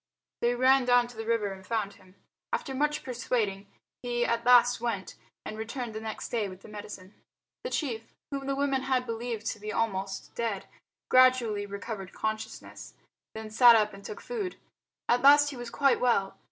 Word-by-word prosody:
They 240 +1 +1
ran 260 +1 +4
down 245 -1 +4
to 245 - -13
the 225 0 -6
river 225 -3 +1
and 190 0 -12
found 205 -1 -2
him. 185 0 -20 0.4
After 270 - -2
much 295 +3 0
persuading 230 -5 -2 0.3
he 240 -1 -1
at 235 0 0
last 245 -1 +5
went, 225 -5 -3 0.3
and 215 - -6
returned 230 +1 -5
next 220 0 -5
day 220 -4 -1
with 185 0 -11
the - - -13
medicine. 205 -2 -9 0.5
The - - -3
chief, 235 - -3 0.2
whom 275 -1 -4
the 275 - 0
women 275 -1 0
had 260 -1 0
believed 230 -1 -4
to 215 - -9
be 210 +1 -5
almost 195 -4 -2
dead, 225 -5 -2 0.4
gradually 250 -5 +4
recovered 200 -1 -6
consciousness, 220 +1 -5 0.4
then 220 0 -7
sat 235 +1 +8
up 210 -1 +2
and 195 0 -12
took 440 - -8
food. 420 -7 -4 0.5
At 245 - +3
last 290 +1 +7
he - - -8
was 240 -1 -7
quite 275 +2 +2
well. 200 -6 +1
230 Hz, 180 wpm, -29 LUFS, 210-255 Hz, 0.5 s, sat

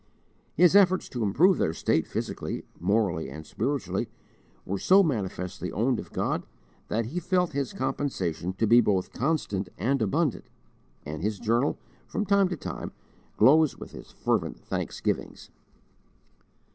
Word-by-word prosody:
His 180 +3 +5
efforts 185 -2 +5
to 125 - -4
improve 155 - +4
their 80 - +1
state - - +1
physically, - - -4 0.2
morally, 100 -6 +1
and 75 +3 -9
spiritually 135 - -2 0.6
were 100 +1 -2
so 195 - +6
manifestly 95 - -3
owned 120 +5 +1
of - - -9
God - - -1 0.4
that 115 +1 -1
he 155 +10 -3
felt 180 0 +1
his 140 -3 -2
compensation 95 - -2
to 105 +4 0
be 120 +3 +6
both 95 -4 0
constant 115 - -1
and 130 +6 0
abundant, 145 - 0 0.6
and 75 +1 -5
his 105 +2 -1
journal, 120 +6 +1 0.3
from 210 - -2
time 200 -1 +4
to 180 -2 -4
time, - - -6 0.5
glows 155 +2 +5
with - - -9
his - - -11
fervent - - -1
thanksgivings. - - -3
120 Hz, 140 wpm, -27 LUFS, 100-160 Hz, 0.6 s, so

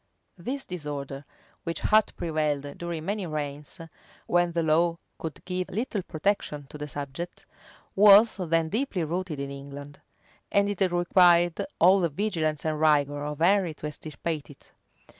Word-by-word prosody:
This 270 +10 -4
disorder, 145 -5 -6 0.4
which 165 - -3
had 215 0 +4
prevailed 150 -3 -2
during 170 -2 -4
many 200 -1 -2
reigns, 150 +1 -5 0.5
when 175 0 +2
the 170 0 0
law 165 +2 +2 0.2
could 160 -3 -7
give 180 0 -3
little 215 0 -2
protection 160 -4 -2
to 150 - -9
the 150 - -4
subject, 145 +5 -6 0.5
was 205 +3 +7
then 165 -3 0
deeply 215 - -1
rooted 170 -1 -3
in 140 0 -4
England; 140 +1 -9 0.5
and 200 0 +3
it 195 -2 0
required 175 -1 +4
all 185 +3 +6
the 170 -2 +1
vigilance 160 -4 -1
and 155 -1 -1
rigor 145 -2 +3
of 150 0 -4
Henry 180 -1 +3
to 150 - -9
extirpate 150 +1 -5
it. 145 - -16
165 Hz, 145 wpm, -27 LUFS, 150-185 Hz, 0.5 s, was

